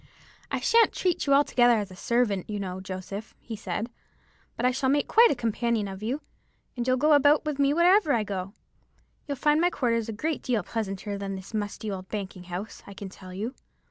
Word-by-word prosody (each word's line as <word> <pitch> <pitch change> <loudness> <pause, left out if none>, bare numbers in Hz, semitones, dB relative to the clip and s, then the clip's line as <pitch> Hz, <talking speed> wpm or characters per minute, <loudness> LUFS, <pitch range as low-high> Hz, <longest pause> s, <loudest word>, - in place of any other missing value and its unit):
'I - - -2
shan't 460 0 +4
treat 360 -5 0
you 280 - +5
altogether 245 -4 +4
as 205 -3 -3
a - - -10
servant, 215 -3 0
you 210 -1 -3
know, 190 -1 -4
Joseph,' 190 +3 -7
he 230 - -7
said, 210 +3 -4 0.7
'but - - -1
I 250 - +4
shall 265 +1 0
make 285 +1 +2
quite 465 +1 +6
a - - +1
companion 230 -2 0
of 190 0 -7
you, 250 +7 -2 0.5
and 245 0 -3
you'll 255 0 +3
go 300 +4 +4
about 290 +2 +5
with 300 -2 -2
me 280 0 +4
wherever 345 +1 +4
I 230 -4 +2
go. 195 -1 -4 0.7
You'll 285 -2 -3
find 300 +3 +3
my 350 - +4
quarters 230 -7 0
a - - -3
great 310 +8 -2
deal 235 -6 0
pleasanter 200 -1 -4
than 195 -1 -4
this 190 +3 -10
musty 210 0 -3
old 185 -1 -6
banking 190 -3 -5
house, 180 +5 -6
I 200 - -10
can 195 0 -7
tell 185 -1 -12
you.' 210 +7 -4
225 Hz, 210 wpm, -27 LUFS, 195-280 Hz, 0.7 s, quite